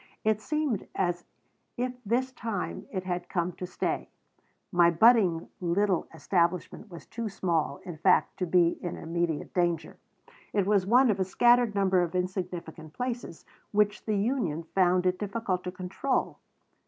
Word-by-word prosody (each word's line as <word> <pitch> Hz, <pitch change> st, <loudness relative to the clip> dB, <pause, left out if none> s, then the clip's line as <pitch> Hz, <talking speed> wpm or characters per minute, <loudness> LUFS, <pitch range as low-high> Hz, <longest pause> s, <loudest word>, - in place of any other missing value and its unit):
It 215 Hz, -1 st, +1 dB
seemed 300 Hz, -6 st, -1 dB
as 175 Hz, -2 st, -1 dB, 0.5 s
if 250 Hz, +1 st, -1 dB
this 245 Hz, +5 st, 0 dB
time 225 Hz, -6 st, -4 dB
it 185 Hz, -3 st, -3 dB
had 180 Hz, -1 st, -3 dB
come 175 Hz, -1 st, -1 dB
to 180 Hz, +1 st, -7 dB
stay. -, -, -2 dB, 0.6 s
My 175 Hz, -2 st, +5 dB
budding 180 Hz, -2 st, +4 dB
little 185 Hz, +1 st, +1 dB
establishment 175 Hz, +5 st, -1 dB
was 170 Hz, -2 st, -10 dB
too 230 Hz, -1 st, -5 dB
small, 165 Hz, -7 st, -1 dB
in 175 Hz, -3 st, -7 dB
fact, 180 Hz, +4 st, +3 dB
to 180 Hz, -, -2 dB
be 170 Hz, -1 st, +3 dB
in 175 Hz, -, -4 dB
immediate 165 Hz, -1 st, -2 dB
danger. 175 Hz, -3 st, 0 dB, 0.6 s
It 200 Hz, -2 st, +2 dB
was 200 Hz, -2 st, +2 dB
one 245 Hz, +2 st, +5 dB
of 200 Hz, -, -2 dB
a -, -, +3 dB
scattered 240 Hz, +3 st, +3 dB
number 190 Hz, -2 st, +3 dB
of 175 Hz, 0 st, -2 dB
insignificant 180 Hz, -4 st, -4 dB
places 245 Hz, -8 st, -5 dB, 0.3 s
which 210 Hz, 0 st, +1 dB
the 215 Hz, -1 st, +1 dB
union 200 Hz, -, -1 dB
found 185 Hz, -1 st, +3 dB
it 180 Hz, 0 st, +1 dB
difficult 200 Hz, -3 st, -2 dB
to 180 Hz, -, -3 dB
control. 185 Hz, +9 st, -2 dB
185 Hz, 155 wpm, -28 LUFS, 175-215 Hz, 0.6 s, My